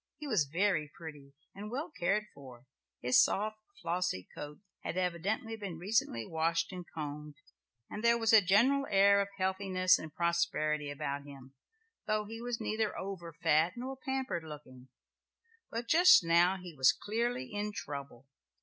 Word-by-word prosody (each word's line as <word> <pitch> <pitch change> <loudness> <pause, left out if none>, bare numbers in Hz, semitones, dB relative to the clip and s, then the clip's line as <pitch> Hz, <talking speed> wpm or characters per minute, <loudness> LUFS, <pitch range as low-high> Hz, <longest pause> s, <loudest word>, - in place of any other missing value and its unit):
He 300 - -8
was 200 - +1
very 170 -4 +1
pretty 145 -4 -10 0.2
and 205 +2 -8
well 275 +7 -4
cared 210 - 0
for; 130 -3 -13 0.4
his 125 +1 +5
soft, 215 +2 -1 0.2
flossy 175 - -1
coat 150 0 -8 0.3
had - - -4
evidently 185 +6 -1
been 200 -6 -6
recently 175 - 0
washed 165 - 0
and 180 -1 -6
combed, 150 -1 -6 0.5
and 210 - -7
there 235 0 +5
was 225 -1 +2
a 220 - +9
general 240 +9 +3
air 200 0 +5
of 200 - -2
healthiness 185 -1 +2
and 155 - -8
prosperity 160 -3 0
about 140 0 -4
him, 135 -2 -12 0.5
though 215 0 0
he 225 +2 -8
was 240 -1 -3
neither 220 -1 -1
over 190 -3 -6
fat 160 +2 +2
nor 260 +2 -5
pampered 265 - -3
looking. 145 -5 -11 0.8
But 230 +1 -4
just 350 - +7
now 170 +3 +4
he 180 -2 -9
was 130 -3 +5
clearly 240 +3 -3
in 205 +1 -2
trouble. 140 - -7
185 Hz, 155 wpm, -32 LUFS, 150-215 Hz, 0.8 s, a